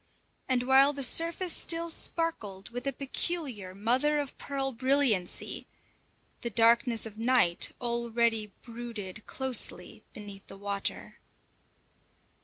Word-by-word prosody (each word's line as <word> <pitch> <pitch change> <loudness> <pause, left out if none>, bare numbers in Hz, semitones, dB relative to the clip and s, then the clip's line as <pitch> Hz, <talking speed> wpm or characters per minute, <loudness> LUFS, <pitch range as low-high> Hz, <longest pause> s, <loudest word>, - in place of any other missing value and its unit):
And 250 -1 +2
while 270 +2 +5
the 280 -1 -2
surface 335 +6 +1
still 335 0 -1
sparkled 315 - -2
with 245 +3 -5
a - - +2
peculiar 270 - -3
mother 255 +9 +2
of 285 -2 -3
pearl 270 -1 -2
brilliancy, 255 -7 +1 0.7
the 235 - -1
darkness 230 +1 +3
of 220 -1 -9
night 230 -8 +4
already 235 -2 0
brooded 225 -4 -7
closely 265 -2 0
beneath 200 -2 -11
the 195 - -10
water. 200 0 -3
240 Hz, 110 wpm, -29 LUFS, 215-275 Hz, 0.7 s, while